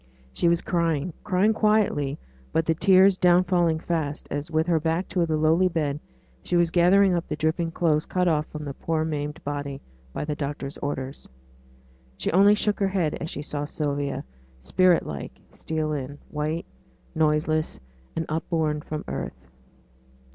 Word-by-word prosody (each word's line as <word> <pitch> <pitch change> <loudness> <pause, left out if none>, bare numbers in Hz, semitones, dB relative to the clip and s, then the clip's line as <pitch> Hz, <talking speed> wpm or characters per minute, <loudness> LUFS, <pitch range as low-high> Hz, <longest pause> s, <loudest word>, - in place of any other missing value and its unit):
She - - +1
was 170 0 +1
crying 165 -1 0
crying 195 +4 +2
quietly, 210 -11 +2 0.3
but 160 - +1
the 165 - +2
tears 190 +2 +5
down 180 0 +5
falling 175 -3 +2
fast, 160 -3 -3
as, 145 +3 -3
with 160 0 +1
her 170 -2 +2
back 165 +4 -1
to 175 -3 +1
the 155 -1 0
lowly 160 +4 +4
bed, 150 -5 -1 0.4
she - - -2
was 170 -1 +3
gathering 185 +2 +5
up 170 -1 -1
the - - -2
dripping 160 +2 0
clothes 160 -3 +1
cut 180 -1 +1
off 155 -2 +1
from 150 -1 -7
the 140 - -4
poor 160 +2 -1
maimed 150 -1 -4
body 145 -1 -4 0.3
by 150 - -4
the 150 - -2
doctors' 140 -1 -5
orders. 135 -1 -5 0.9
She - - -1
only 200 +4 +6
shook 210 0 0
her 200 - +2
head 185 -6 0
as 160 - -3
she 145 - -5
saw 145 -1 -3
Sylvia, 145 -2 -2 0.4
spirit 180 - +3
like, 70 -1 -7
steal 155 -1 -2
in 145 0 -5
white, 155 +3 -2 0.5
noiseless, 155 0 +1 0.4
and 165 - -1
upborne 155 -1 -1
from 155 0 -6
earth. - - -5
160 Hz, 165 wpm, -25 LUFS, 150-175 Hz, 0.9 s, only